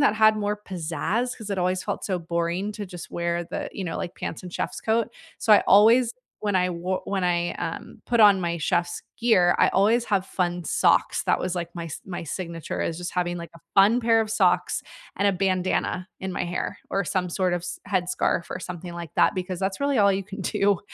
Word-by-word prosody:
that 250 -7 +4
had 215 0 +5
more 210 0 -2
pizzazz 185 +8 -2
'cause 220 -3 -8
it 195 -2 -2
always 180 +1 +1
felt - - -4
so 185 -3 -1
boring 170 +4 -2
to 205 0 -6
just 180 -2 -9
wear 170 0 -2
the, - - -5
you 195 - -5
know, 165 - -3
like, 175 - -5
pants - - -5
and 180 -1 -9
chef's - - -3
coat. 225 +1 +1 0.3
So 220 - +4
I 210 - +7
always, 225 +5 +6 0.3
when 205 -2 0
I 180 0 +2
wo 180 +2 -2
when 195 -2 -2
I, 175 -1 +1
um, 165 - -6
put 235 -1 0
on 205 -3 +7
my 170 -1 -1
chef's 170 +3 -1
gear, 185 -7 +4
I - - +6
always 220 +5 +3
have 195 -2 +1
fun 175 -2 -2
socks. - - +2
That - - +2
was 185 - -2
like 170 -1 -3
my 170 -1 -6
s 160 - -7
my 175 -3 -6
signature 165 0 -5
is 165 0 -2
just 180 - -5
having 175 -1 0
like 170 -1 -8
a 165 - -14 0.2
fun 205 +5 +6
pair 225 -1 +4
of 220 - -1
socks 220 - +2 0.3
and 200 - +3
a 200 - +2
bandana 185 0 0
in 190 -1 -4
my - - -2
hair 175 0 -3
or 195 0 0
some 180 +2 -1
sort 185 0 0
of 175 - -2
s 175 0 -6
headscarf 180 -2 0
or - - -3
something 180 -1 -7
like 170 -3 -8
that - - +3
because 185 0 -3
that's 190 0 -1
really 280 -3 +1
all 200 -1 +5
you 195 0 -2
can 200 +1 -8
do 195 0 +1
185 Hz, 225 wpm, -25 LUFS, 175-205 Hz, 0.3 s, I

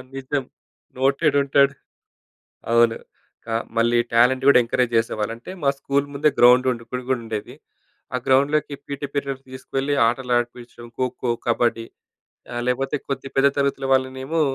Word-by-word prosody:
నిజం 135 0 -2 0.5
నోటేడ్ 140 +3 +2
ఉంటాడు. 140 0 +3 1.0
అవును 115 -1 +4 0.5
క - - -27 0.3
మళ్ళీ 120 +1 +3 0.2
టాలెంట్ 125 +3 +4
కూడా 140 - +7
ఎంకరేజ్ 120 0 0
చేసేవాళ్ళు. 110 -1 -1
అంటే 120 +10 -10
మా 140 - +4
స్కూల్ 140 +1 0
ముందే 150 +2 +2
గ్రౌండ్ 125 +1 +6
ఉండే 115 -2 -6
ఇప్పుడు 125 +1 -5
కూడా 130 -2 +1
ఉండేది. 110 -2 -5 0.6
ఆ - - +2
గ్రౌండ్‌లోకి 140 +2 +2
పీటీ 140 0 -4
పీరియడ్ 140 -2 -3
తీసుకువెళ్ళి 135 +2 -3
ఆటలు 125 +1 -1
ఆడిపించడం. 120 0 -6
ఖోఖో, 125 -1 -2 0.2
కబడ్డీ, 120 -1 +1 0.7
ఆహ్, 120 0 -3
లేకపోతే 135 +3 0
కొద్ది 135 -1 -4
పెద్ద 140 +1 +5
తరగతుల 140 -1 0
వాళ్ళనేమో 130 +4 0
130 Hz, 140 wpm, -22 LUFS, 120-140 Hz, 1.0 s, కూడా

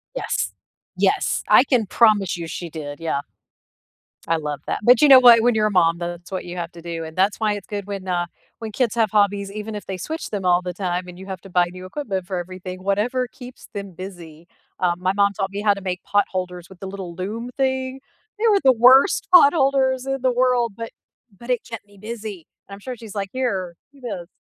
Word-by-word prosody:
Yes. - - -2 0.4
Yes, - - +1
I - - +7
can 250 -6 +1
promise 205 -5 +3
you 170 - -5
she 170 +1 -6
did, 145 -2 -7
yeah. 160 -4 -1 1.1
I 165 - +2
love 150 -2 -4
that, - - -1
but 245 +1 +6
you 300 - +7
know 265 -1 +11
what, 240 -2 +8
when 240 +1 +3
you're 215 -1 +3
a 210 - -2
mom, 170 -3 +3
that's 175 0 -6
what 185 - -4
you 175 0 -7
have 170 0 -4
to 170 - -11
do, 165 -1 -5
and 160 0 -9
that's 195 +3 +1
why 215 -2 +1
it's 205 -2 -7
good 205 -2 -5
when, 195 -2 -6
uh 175 -1 0 0.3
when 225 -1 -6
kids 235 +1 0
have 225 -3 +2
hobbies, 200 -1 +1
even 215 +1 -6
if 210 - -7
they 190 - -5
switch 320 - -5
them 200 -3 -4
all 175 0 +4
the 180 0 -4
time, 180 -1 -3
and 180 0 -11
you 190 - -9
have 190 -2 -7
to 195 - -13
buy 180 -1 +3
new 185 0 -10
equipment 195 -4 -4
for 185 +1 -4
everything, 185 +1 -7
whatever 220 +7 0
keeps 250 0 -13
them 200 -2 -6
busy. 170 -3 -10 0.3
Um, 180 -1 0
my 185 0 +2
mom 200 0 +2
taught 195 0 -3
me 200 +1 -4
how 205 -1 +4
to 200 - -8
make 185 -1 -3
potholders 180 -3 -1
with 190 -2 -15
the 195 - -6
little 190 -3 -7
loom 215 +7 -5
thing. 260 -1 -1 0.4
They 460 - +2
were 405 -2 +4
the 265 - +7
worst 255 - +5
potholders 270 -5 +5
in 270 -1 -2
the 255 0 +2
world, 245 -2 +2
but 230 0 -6 0.5
but 235 +4 -12
it 250 -1 +1
kept 230 -3 -7
me 205 0 -21
busy. 210 -4 -7 0.2
And - - -9
I'm 200 - -9
sure 250 +5 -6
she's, 220 -3 -11
like, 195 -1 -3
"Here, 195 -9 -2 0.2
do 280 - -20
this." 200 -9 -6
200 Hz, 230 wpm, -22 LUFS, 180-235 Hz, 1.1 s, know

